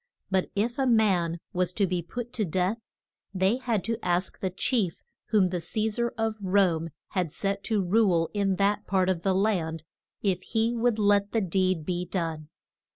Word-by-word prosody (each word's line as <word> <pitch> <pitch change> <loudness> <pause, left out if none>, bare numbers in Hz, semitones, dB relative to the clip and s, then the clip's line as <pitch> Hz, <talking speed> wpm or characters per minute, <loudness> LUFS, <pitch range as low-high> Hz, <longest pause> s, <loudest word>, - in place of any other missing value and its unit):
But 190 -1 +1
if 235 +6 -1
a 265 - +2
man 190 -8 +2
was 180 -1 +1
to 200 - +2
be 180 -1 -1
put 240 +7 -7
to 220 - 0
death 185 +5 0 0.6
they 190 +5 +2
had 235 -7 -1
to 230 0 -3
ask 180 +2 0
the 190 - -1
chief 190 -1 -1 0.2
whom 200 -4 +3
the 180 -1 -2
Ce 215 +5 -1
sar 235 +2 0
of 225 -1 -1
Rome 185 -4 +2 0.2
had 180 -5 -1
set 200 +3 -2
to 215 -4 +1
rule 180 -4 +3
in 200 -2 +1
that 200 +2 +1
part 190 -1 +2
of 180 -3 0
the 190 +1 +1
land 175 -6 0 0.4
if 190 -3 +1
he 225 +3 0
would 235 -1 +1
let 205 -1 +2
the 225 - +2
deed 185 -3 0
be 180 0 -2
done. 165 -4 -3
195 Hz, 185 wpm, -27 LUFS, 180-220 Hz, 0.6 s, whom